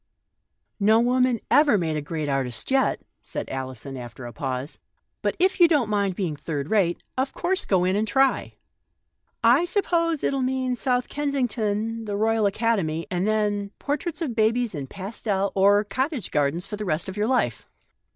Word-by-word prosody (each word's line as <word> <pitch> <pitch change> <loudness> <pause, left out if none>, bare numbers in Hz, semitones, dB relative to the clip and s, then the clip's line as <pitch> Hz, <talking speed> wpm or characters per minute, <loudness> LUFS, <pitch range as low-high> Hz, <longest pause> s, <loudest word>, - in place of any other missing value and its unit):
" - - -52
No 220 - +6
woman 250 0 +2
ever 290 -7 +5
made 160 -4 -1
a 150 - -1
great 155 +1 -4
artist 135 - -2
yet," 270 0 +2 0.2
said - - -5
Alison, 130 -1 -5
shrugging 125 -2 -6 0.2
her 120 - -8
shoulders, 130 +2 -4 0.2
" - - -52
but - - 0
if 375 +2 +2
you 345 - +8
don't 285 -10 +2
mind 200 -3 +1
being 175 -6 -2
third 145 +1 -4
rate, 185 -6 +2 0.2
of 265 +1 -1
course 375 +3 0
go 185 -3 +2
in 185 +1 +1
and 215 +2 0
try. 270 +4 +1 0.9
I 245 +8 +5
suppose 340 -4 0
it'll 275 -1 +1
mean 255 0 0
South 250 0 0
Ken 290 -1 -2
sington, 225 -3 -1
the 205 -1 -2
Royal 220 0 +2
Academy, 195 -7 0
and 180 +2 0
then 205 -2 0
— - - -57
por 285 - -1
traits 335 +1 -5
of 270 -7 -2
babies 225 +1 +1
in 140 -4 -5
pastel 195 - -2
or 200 +2 +4
cottage 260 - -2
gardens 150 +5 0
for 210 - -6
the 210 - -4
rest 160 -1 -1
of 190 - -6
your 210 +1 0
life." 230 - 0
215 Hz, 190 wpm, -25 LUFS, 175-255 Hz, 0.9 s, you